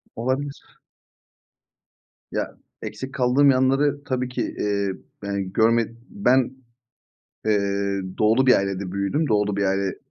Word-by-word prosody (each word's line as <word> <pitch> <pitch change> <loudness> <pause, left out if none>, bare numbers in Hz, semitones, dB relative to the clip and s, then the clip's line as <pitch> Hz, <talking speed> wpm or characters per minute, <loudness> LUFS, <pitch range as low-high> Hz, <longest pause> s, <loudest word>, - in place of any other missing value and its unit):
Olabilir. 130 +4 -3 1.5
Ya, - - -3 0.3
eksik 130 0 -6
kaldığım 135 +2 +4
yanları 135 +2 +2
tabii 130 -1 -1
ki, 125 - -3 0.2
eee, 100 -1 0 0.3
yani 100 -2 -3
görme 115 0 +3 0.2
ben, 130 - +2 1.0
eee, 100 -1 +1 0.2
Doğulu 115 +5 +4
bir 125 - +7
ailede 100 -1 -3
büyüdüm. 100 +11 0
Doğulu 105 -2 +1
bir 100 - +1
aile, 95 +1 +1
ııı, 95 - -2
110 Hz, 120 wpm, -23 LUFS, 100-130 Hz, 1.5 s, bir